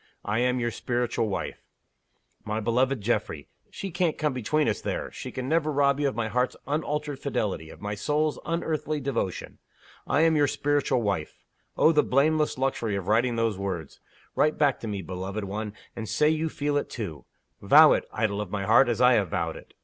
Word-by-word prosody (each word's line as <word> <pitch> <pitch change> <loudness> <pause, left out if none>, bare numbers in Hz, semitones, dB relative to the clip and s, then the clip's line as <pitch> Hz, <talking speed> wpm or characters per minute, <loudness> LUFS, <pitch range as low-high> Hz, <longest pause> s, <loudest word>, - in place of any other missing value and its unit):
I 105 +3 0
am 125 +1 +1
your 120 -1 -1
Spiritual 120 -2 -1
Wife. 100 - -4 0.8
My 105 +1 -2
beloved 125 +3 +1
Geoffrey! 100 -9 -2 0.2
she 195 - -6
can't 175 -2 0
come 150 -3 0
between 135 +5 0
us, 110 - -1
there - - -3
she - - -7
can 130 0 -5
never 155 0 +1
rob 140 -1 +2
you 145 - +2
of 135 - -2
my 115 -2 -1
heart's 125 +3 0
unalterable 150 -1 -2
fidelity, 100 - -2
of - - -13
my 105 0 -3
soul's 150 +8 0
unearthly 155 -2 -2
devotion. 125 -9 -3 0.5
I 145 - +2
am 165 -1 +4
your 145 -1 +4
Spiritual 140 -4 0
Wife! 95 -7 -2 0.4
Oh, 160 - +6
the 150 -2 +4
blameless 150 +3 +2
luxury 130 -5 -1
of 95 -2 -4
writing 120 +3 +2
those 115 -4 0
words! 90 -6 -4 0.4
Write 155 +1 +2
back 145 -3 +2
to 115 - -6
me, 100 -3 -4
beloved 95 +4 -5
one, 105 +2 -4 0.2
and 110 -2 -5
say 150 - +3
you 160 +1 0
feel 145 -1 -1
it 145 - -2
too. 85 - -6 0.4
Vow - - +8
it, - - -1
idol 105 -2 -1
of 105 - -5
my 100 0 -3
heart, 115 +4 +5
as 120 0 0
I 125 0 +7
have 100 -6 +2
vowed - - -2
it. - - -13
125 Hz, 195 wpm, -26 LUFS, 105-145 Hz, 0.8 s, Vow